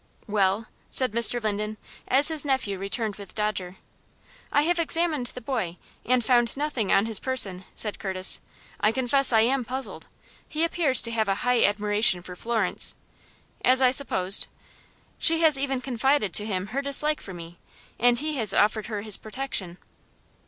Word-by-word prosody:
"Well," 205 0 0 0.2
said 255 -3 +1
Mr. 235 +2 +4
Linden, 210 0 -3 0.3
as 275 +4 +4
his 315 -2 -1
nephew 260 -9 -2
returned 205 +1 -3
with 200 -2 -12
Dodger. 195 -4 -3 0.7
"I 290 - +3
have 345 +2 0
examined 325 -5 -1
the 250 - -8
boy, 220 -9 -4 0.3
and 250 -1 +1
found 240 -1 +2
nothing 280 -9 -2
on 195 +2 +3
his 225 -3 0
person," 195 -8 +2
said 210 -2 -3
Curtis; 190 -2 +2 0.4
"I 210 - +2
confess 260 +2 +3
I 225 -2 +4
am 255 +3 +1
puzzled. 260 +3 -6 0.4
He 310 +2 -2
appears 330 -6 +3
to 230 - +1
have 220 -2 -1
a 195 - 0
high 245 -1 +2
admiration 205 -3 +2
for 180 0 -9
Florence 225 -1 -2 0.3
" - - -31 0.3
"As 255 +1 +4
I 255 -1 +4
supposed." 200 -8 +3 0.7
"She 330 0 +5
has 315 -3 +5
even 270 -2 -2
confided 255 -4 0
to 210 - +2
him 185 -3 -3
her 275 - -1
dislike 295 +2 0
for 190 - -9
me, 170 0 -11 0.4
and 245 +1 +3
he 305 +2 -3
has 215 -5 0
offered 215 +1 +1
her 210 -3 -5
his 215 -2 0
protection." 215 -6 -3
230 Hz, 170 wpm, -25 LUFS, 205-270 Hz, 0.7 s, She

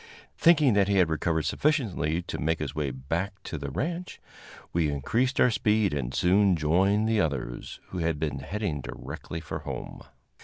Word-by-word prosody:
Thinking 155 -7 +5
that 100 -1 +3
he 100 -1 +2
had 90 -4 +4
recovered 80 0 0
sufficiently 100 - 0
to - - -5
make 80 +2 +1
his 75 -4 -4
way 75 -2 -1
back 80 +10 -3
to - - -5
the 70 -1 -4
ranch, 170 - -4 0.5
we 85 -3 +2
increased 115 - 0
our 125 - +5
speed 105 -4 +2
and 60 -4 -2
soon 95 +4 +4
joined 95 +7 +2
the 110 -2 +3
others, 65 -7 -3
who 90 - -5
had 80 -2 0
been 75 -2 -2
heading 90 -1 -3
directly 80 - -7
for - - -5
home. - - -7
85 Hz, 170 wpm, -27 LUFS, 75-105 Hz, 0.5 s, Thinking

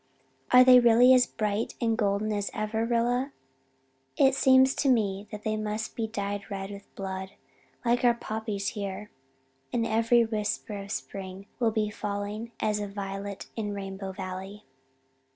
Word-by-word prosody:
Are 250 0 +9
they 255 -1 +8
really 240 +2 +6
as 250 -1 +5
bright 210 0 -2
and 230 -2 +1
golden 210 -1 0
as 205 -1 -2
ever, 220 +1 -1
Rilla? 245 +3 +1 0.8
It 270 -1 +5
seems 265 0 +5
to 280 - +2
me 205 -4 +1
that 210 -1 -7
they 215 0 0
must 215 +1 -3
be 225 -1 -2
dyed 205 -2 -4
red 195 -1 -5
with 200 0 -12
blood 190 -1 -5 0.5
like 240 +1 +2
our 240 -1 +5
poppies 215 -3 -3
here. 205 -1 -6 0.6
And 235 -2 0
every 230 +2 +3
whisper 215 -1 -3
of 200 0 -7
spring 190 0 -6
will 235 -2 +3
be 215 -1 -1
falling 210 +2 -4
as 210 -1 0
a 205 - -3
violet 200 0 -6
in 210 -2 -3
Rainbow 195 -1 -5
Valley. 190 +2 -7
210 Hz, 155 wpm, -28 LUFS, 200-230 Hz, 0.8 s, Are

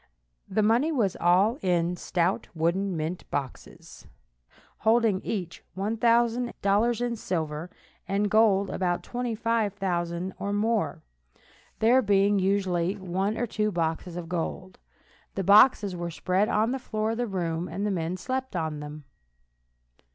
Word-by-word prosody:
The 210 +3 +1
money 235 +9 +3
was 225 - +1
all 190 - +3
in 175 -1 +1
stout 175 +1 -1
wooden 175 +3 0
mint 160 +3 -4
boxes, 135 -3 -7 0.7
holding 220 -3 +3
each 180 -6 -4
$1,000 230 +1 +1
in 240 -1 -1
silver, 160 -5 -3 0.4
and 195 +2 0
in - - +2
gold 200 -2 +3
about 175 -2 -1
$25,000 200 -7 -2
or 200 0 -2
more, 210 -6 0 0.7
there 240 +4 +4
being 200 -2 +3
usually 190 -2 +1
one 190 +3 -2
or 240 - 0
two 215 -1 -1
boxes 165 0 -2
of 175 -1 -5
gold. 180 +2 -4 0.6
The 195 - -1
boxes 205 0 +5
were 175 0 -4
spread 185 +5 0
on 220 +2 +2
the 265 - -2
floor 220 -3 -2
of 225 - -3
the 245 0 -1
room, 175 -3 -2
and 185 +5 -3
the 210 - 0
men 175 -1 -2
slept 260 +3 -4
on 160 -3 -2
them. 150 0 -8
195 Hz, 135 wpm, -27 LUFS, 175-220 Hz, 0.7 s, boxes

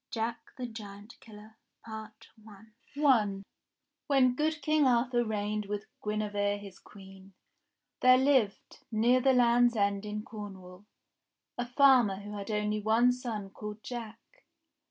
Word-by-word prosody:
S - - -6
JACK 230 +1 -4
THE 250 - -4
GIANT 210 -2 -10
KILLER 215 0 -15 0.3
I 220 -1 -7 0.9
WHEN 255 +1 0
good 305 +1 -1
King 305 -1 +3
Arthur 240 0 +2
reigned 210 -1 -3
with 205 0 -4 0.2
Guinevere 205 -1 -1
his 200 -2 -12
Queen, 195 -1 -15 0.7
there 255 0 +6
hved, 260 -6 +1
near 235 +4 +3
the 265 +1 +4
Land's 240 -1 +4
End 200 -1 0
in 210 0 -5
Corn 205 -3 -8
wall, 180 +2 -15 0.7
a 245 0 -3
farmer 250 -5 +5
who 205 +2 -9
had 200 0 -7
one 210 -1 0 0.4
only 250 - +6
son 225 -6 -5
called 210 +1 -8
Jack. 230 -3 -7
220 Hz, 135 wpm, -30 LUFS, 205-245 Hz, 0.9 s, there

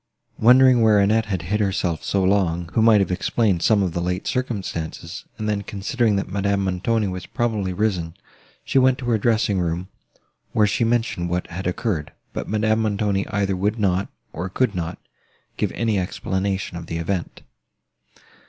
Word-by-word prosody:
Wondering 125 +1 +6
where 110 -2 +5
Annette 110 +2 +3
had 95 -5 -2
hid 105 +5 -1
herself 95 -5 -1
so 100 -1 0
long, 90 -4 +1
who 115 - +2
might 110 -2 +6
have 95 - 0
explained 95 0 +1
some 105 +1 +3
of 90 -3 -2
the 85 - -2
late 90 +1 -2
circumstances, 95 -8 -4
and 110 - -3
then 105 -1 0
considering 105 +3 0
that 100 - -1
Madame 100 0 0
Montoni 95 +4 0
was 90 -1 -5
probably 110 -5 -1
risen, 90 -4 -1 0.5
she 135 - +3
went 130 0 +4
to 130 - -7
her 110 - +2
dressing 110 -3 +2
room, 85 +2 -2 0.6
where 105 - +4
she 105 +3 +1
mentioned 115 -7 0
what 90 +1 -1
had 90 +2 -4
occurred; 90 -5 -2 0.2
but - - -5
Madame 110 +1 +1
Montoni 100 -2 0
either 100 -2 0
would 105 +4 0
not, 95 -2 +1 0.3
or 90 +4 -4
could 130 +7 0
not, 85 -2 -4 0.6
give - - -1
any 110 -4 0
explanation 95 0 -2
of 85 - -8
the 85 - -3
event. 85 +1 -3
100 Hz, 170 wpm, -22 LUFS, 90-110 Hz, 0.6 s, Wondering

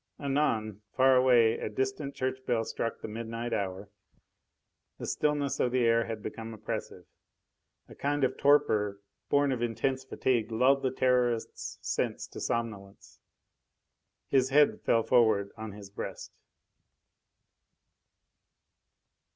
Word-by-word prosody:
Anon, 115 -8 0
far 130 0 +5
away 120 -3 +4
a - - -3
distant 135 +2 -3
church 130 0 -3
bell 115 -2 +1
struck 115 - -3
the - - -5
midnight 115 +2 -5
hour. 100 +1 -3 1.1
The - - -6
stillness 145 -2 0
of 125 - +1
the 125 -1 +2
air 115 0 +3
had 110 -2 -6
become 115 0 -6
oppressive. 110 - -6 0.8
A - - -13
kind 145 0 -1
of 130 0 +1
torpor 110 -9 +3 0.3
born 145 -1 +3
of 125 -3 -2
intense 130 +3 -1
fatigue 120 -3 -1
lulled 130 +4 +3
the 130 - +1
Terrorist's 125 -2 0
senses - - -2
to - - -9
somnolence. 105 -4 -4 1.1
His 130 -1 +3
head 145 +2 +4
fell 115 -1 +2
forward 110 -5 +3
on 110 -2 -7
his 100 -1 -11
breast.... - - -7
120 Hz, 125 wpm, -29 LUFS, 110-130 Hz, 1.1 s, far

